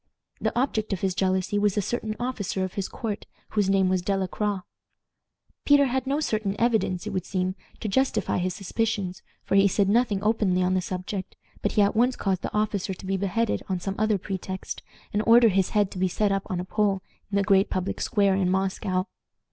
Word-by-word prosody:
The - - 0
object 220 -5 0
of 185 - -3
his 190 -2 +1
jealousy 190 +2 +1
was 205 0 +1
a - - +3
certain 220 0 -2
officer 220 -6 -2
of 185 - -4
his 195 -2 -2
court 220 -3 -5 0.2
whose 205 -3 +1
name 195 -1 +3
was 185 -1 +1
De 195 +2 0
la 190 - 0
Croix. 205 0 -2 1.0
Peter 285 -1 +5
had 260 0 -1
no 280 +2 +1
certain 215 -9 -1
evidence, 220 -6 +1
it 210 - -3
would 185 -3 -2
seem, 185 0 -1 0.3
to 220 - -2
justify 265 -1 +1
his 180 0 -1
suspicions, 200 -2 -2 0.2
for - - -3
he 195 0 +6
said 200 +1 +2
nothing 215 -3 +2
openly 205 -4 +2
on 185 +1 +2
the 185 - +2
subject, 185 +1 -5 0.3
but - - 0
he 210 - +5
at 200 - +1
once 245 +3 +3
caused 190 -2 -1
the - - -4
officer 205 -3 -1
to 190 - -11
be 195 +1 0
beheaded 200 +4 0
on 185 -1 0
some 195 +2 -3
other 215 -1 +2
pretext, 190 0 -5 0.3
and 205 - +2
ordered 230 -1 +7
his 190 -1 +2
head 205 -3 +1
to 185 - -6
be 185 - +3
set 205 +3 +1
up 195 0 +1
on 180 - -2
a 180 - -3
pole 200 -1 0 0.3
in 200 - +1
a 200 - +3
great 195 -1 +4
public 185 0 -2
square 200 -2 +2
in 190 -1 +1
Moscow. 190 -1 0
195 Hz, 215 wpm, -26 LUFS, 185-215 Hz, 1.0 s, ordered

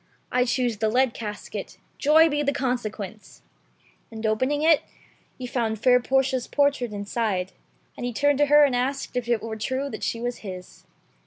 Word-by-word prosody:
I 250 0 +2
choose 245 -2 0
the 220 +1 +1
lead 250 +1 +2
casket; 210 -2 -7 0.2
joy 315 +3 +6
be 295 -2 0
the 280 -1 +1
consequence 230 -7 -4 0.3
!" - - -35
And 220 0 -6
open 220 +5 +1
ing 295 +1 -1
it, 320 -2 +5 0.6
he 255 - -6
found 230 -3 -1
fair 250 +1 +5
Portia's 265 0 0
portrait 285 -5 +1
inside, 205 -2 -2 0.4
and - - -7
he 245 - -1
turned 285 +4 +2
to 290 - +4
her 295 +1 +7
and 275 -3 +3
asked 260 +2 -2
if 250 -1 -2
it 235 -2 +1
were 225 -1 -4
true 265 +5 -2
that - - -7
she 230 - -2
was 240 +1 -3
his. 185 -3 -10
245 Hz, 185 wpm, -25 LUFS, 220-275 Hz, 0.6 s, her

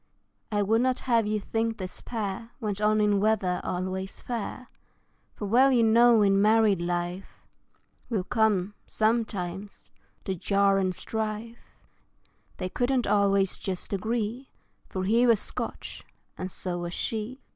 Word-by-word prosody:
I 205 -1 +1
would 225 +3 +2
not 255 0 +1
have 230 -4 +2
you 215 0 0
think 225 +2 -2
this 185 -2 -7
pair 220 -1 -4
Went 210 -4 -3
on 215 0 +3
in 205 -1 +3
weather 200 -4 +1
always 185 +1 -3
fair, 240 +1 -5 0.7
For 210 - -5
well 250 +7 +5
you 240 -3 +4
know 230 0 +6
in 195 0 +4
married 215 -3 +4
life 175 +2 -2 0.8
Will 215 -6 0
come, 210 -3 +1
sometimes, 205 -4 -2 0.3
the 190 - -2
jar 195 +2 +2
and 185 -1 0
strife; 220 +3 -4 1.0
They 185 - -3
couldn't 245 +5 0
always 200 -2 +2
just 190 +1 -4
agree 225 +5 -2 0.4
For 185 - -3
he 230 +6 +3
was 230 -3 +5
Scotch, - - -6 0.3
and 185 - -5
so 180 -1 -4
was 175 0 -4
she. 225 +4 -3
210 Hz, 140 wpm, -27 LUFS, 190-230 Hz, 1.0 s, know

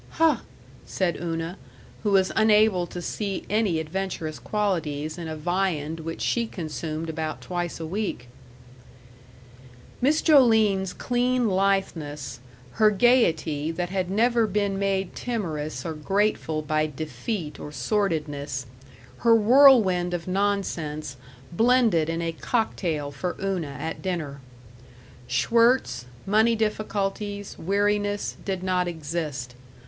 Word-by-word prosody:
"Huh!" 325 -1 +4 0.5
said 180 -3 -1
Una, 165 +1 -3 0.4
who 210 - 0
was 190 -2 +3
unable 215 -4 +4
to 175 +1 -7
see 200 0 -3
any 205 -6 +2
adventurous 160 -1 -4
qualities 160 -8 -1
in 170 -2 -6
a 160 - -4
viand 165 -1 -1
which 165 +1 -6
she 235 -1 +1
consumed 160 -3 -5
about 160 -1 -3
twice 175 -2 -4
a 165 - -4
week. 180 - -3 1.7
Miss 295 +5 +3
Joline's 220 - +4
clean 245 +1 0
litheness, 185 -9 -1 0.3
her 215 - +4
gaiety 165 - +2
that 175 +2 -3
had 185 -2 -1
never 230 +3 +3
been 200 -1 0
made 195 -2 -1
timorous 165 -12 -3
or 165 - -2
grateful 160 -1 0
by 155 0 +1
defeat 155 - -5
or 150 - -7
sordidness, 150 - -1 0.5
her 230 -1 +5
whirlwind 215 -7 +6
of 170 0 -6
nonsense, 180 -7 -1 0.4
blended 225 -5 +3
in 165 +1 -2
a 165 - -1
cocktail 165 -7 -1
for 175 +6 -4
Una 180 -8 -2
at 160 - -4
dinner. 155 -7 -3 0.9
Schwirtz, 145 - +2 0.2
money 220 +3 +3
difficulties, 205 -2 -2
weariness, 205 +2 0
did 190 -2 -3
not 180 -1 +1
exist. 150 -6 -4
185 Hz, 115 wpm, -25 LUFS, 155-210 Hz, 1.7 s, whirlwind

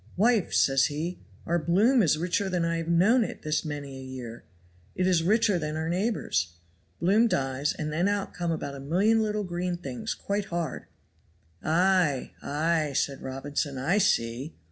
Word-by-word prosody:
'Wife,' 220 -1 +2
says 135 0 +4
he, 160 +5 -4 0.3
'our 170 +1 +1
bloom 210 - +3
is 155 -6 +3
richer 180 +4 -1
than 180 -2 0
I 170 0 0
have 165 0 -4
known 195 +9 +4
it - - -6
this 155 -1 0
many 145 -3 -6
a - - -8
year, 125 -3 -8 0.5
it 185 - 0
is 180 -3 +3
richer 210 +1 +3
than 155 -1 -3
our 160 +1 -2
neighbors'.' 170 - -1 0.5
Bloom 205 +7 +4
dies, 135 -5 0
and 155 -1 -4
then 175 +5 +1
out 205 -1 -1
come 175 -2 -2
about 145 -3 -3
a 140 - -8
million 195 +11 +2
little 210 -1 -1
green 180 -1 -2
things 135 -8 -5
quite 200 0 -2
hard." 170 -3 -4 0.8
"Ay! 170 -4 +2
ay!" 155 0 0
said 135 0 -1
Robinson; 140 +1 -3
"I 170 +11 +1
see." 125 - 0
170 Hz, 170 wpm, -27 LUFS, 145-190 Hz, 0.8 s, says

